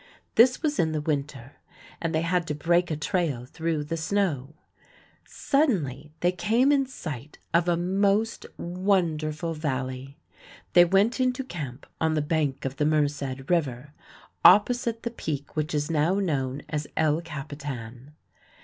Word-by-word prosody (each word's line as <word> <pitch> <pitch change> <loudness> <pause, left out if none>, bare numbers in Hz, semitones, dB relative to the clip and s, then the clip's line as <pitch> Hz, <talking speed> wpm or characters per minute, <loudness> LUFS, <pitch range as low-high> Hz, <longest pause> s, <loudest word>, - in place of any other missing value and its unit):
This 250 +6 +5
was 300 -1 0
in 160 -1 +2
the 155 - -1
winter, 145 -3 -3 0.4
and 165 - -1
they 160 0 0
had 175 0 0
to 150 - -2
break 170 +4 +2
a 155 - -1
trail 150 - -1
through 160 +2 -2
the 165 +3 -3
snow. 160 -6 -1 0.7
Suddenly 155 - 0
they 175 - +3
came 225 +10 +2
in 275 -2 +3
sight 150 - -7 0.2
of 170 +1 +3
a 170 - +2
most 200 +5 +1
wonderful 170 -4 0
valley. 135 -2 -4 0.6
They 175 0 +8
went 200 +8 +2
into 255 +1 +1
camp 145 - -7 0.2
on 160 -1 +2
the 155 - +1
bank 150 -4 -1
of 135 0 -3
the 150 - +1
Merced 145 -3 -1
River, 145 -5 -1 0.5
opposite 230 +2 +5
the 235 - -2
peak 145 - -5
which 155 0 -1
is 150 +2 -1
now 160 +4 +2
known 145 -8 -1
as 150 -1 -3
El 155 0 +2
Capitan. 140 -4 -7
160 Hz, 150 wpm, -26 LUFS, 145-185 Hz, 0.7 s, They